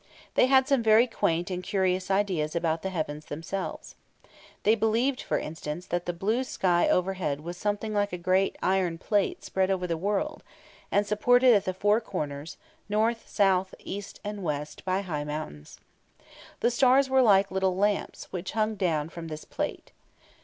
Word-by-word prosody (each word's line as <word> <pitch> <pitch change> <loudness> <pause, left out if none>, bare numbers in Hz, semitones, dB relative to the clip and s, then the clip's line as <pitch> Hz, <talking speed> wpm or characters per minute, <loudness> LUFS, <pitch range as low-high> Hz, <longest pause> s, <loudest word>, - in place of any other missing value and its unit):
They - - +4
had 265 0 +5
some 275 -4 +3
very 220 +1 +6
quaint 185 -6 -1
and 180 0 -3
curious 185 -1 0
ideas 185 -6 0
about 165 -1 0
the 190 - -3
heavens 155 -4 -4
themselves. 165 +6 -5 0.7
They 215 - +5
believed, 230 +4 +1
for - - -1
instance, 160 +2 -5
that 175 0 -3
the - - +1
blue 210 +9 0
sky 180 -8 +1
overhead 180 -6 0
was 170 +3 -6
something 210 +3 -2
like 205 -1 +1
a 180 - -3
great 185 +2 +1
iron 185 -3 +1
plate 200 +3 0
spread 190 0 0
over 185 -2 0
the 170 -2 -1
world, 205 - -2 0.5
and 205 +1 +3
supported 245 +4 +4
at 205 - +2
the 185 - -1
four 205 +4 +2
corners, 150 -7 -5 0.3
north, 225 +2 0
south, 190 -2 +2
east, 200 +1 -7
and 205 -1 -5
west, 150 -3 -4
by 185 +1 0
high 155 -7 -3
mountains. 150 - -7 0.8
The 240 - +3
stars 260 +2 +4
were 265 0 +4
like 200 -5 +4
little 190 -1 +1
lamps, 205 +1 0
which 185 0 -5
hung 220 0 +1
down 165 -7 -1
from 165 -1 -8
this 155 -1 -7
plate. - - -5
190 Hz, 170 wpm, -27 LUFS, 170-210 Hz, 0.8 s, very